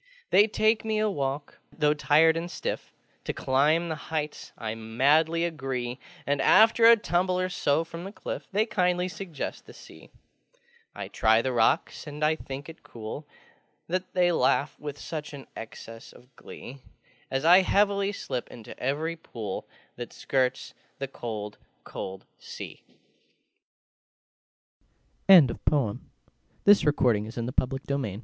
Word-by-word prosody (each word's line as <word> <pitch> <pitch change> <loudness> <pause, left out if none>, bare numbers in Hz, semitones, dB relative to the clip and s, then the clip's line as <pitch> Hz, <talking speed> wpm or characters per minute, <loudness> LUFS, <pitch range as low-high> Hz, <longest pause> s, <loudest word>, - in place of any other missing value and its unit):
They 205 +2 +6
take 215 +1 +2
me 220 -1 -1
a 215 0 +1
walk: 140 -2 -3
though 150 -2 +2
tired 155 +2 +4
and 165 +1 -3
stiff, - - -4 0.3
To - - -2
climb 150 +6 +2
the 160 - -2 0.2
heights 155 -2 -4
I 110 -2 -4
madly 145 +9 +2
agree; 130 -6 -4 0.3
And, 140 -1 0
after 225 +6 +6
a 230 0 +9
tumble 180 -2 0
or 185 0 0
so 160 -3 +1
from 165 +1 -8
the 195 - -7
cliff, - - -6
They 210 +2 +2
kindly 180 -4 +1
suggest 180 -5 -6
the - - -13
Sea. - - -14 0.9
I - - -5
try 110 +1 +3
the 130 - -1
rocks, 115 +6 +1
and 150 +1 -2
I 155 +1 +3
think 140 -2 -8
it 165 0 -11
cool 115 +6 -8 0.6
That 185 +2 -2
they 180 -1 +4
laugh 140 -2 +2
with 145 -1 -6
such 150 -2 -6
an 135 - -10
excess 115 0 -10
of 125 0 -20
glee, 135 +3 -11 0.5
As 135 +3 -1
I 175 +3 +8
heavily 200 +1 +2
slip 125 -10 -4
into 115 -3 -11
every 155 +5 -1
pool 115 - -6 0.3
That 120 -1 -6
skirts 130 -1 -1 0.2
the 135 - -4
cold 105 -5 -6 0.2
col 95 0 -7
150 Hz, 130 wpm, -27 LUFS, 130-180 Hz, 0.9 s, a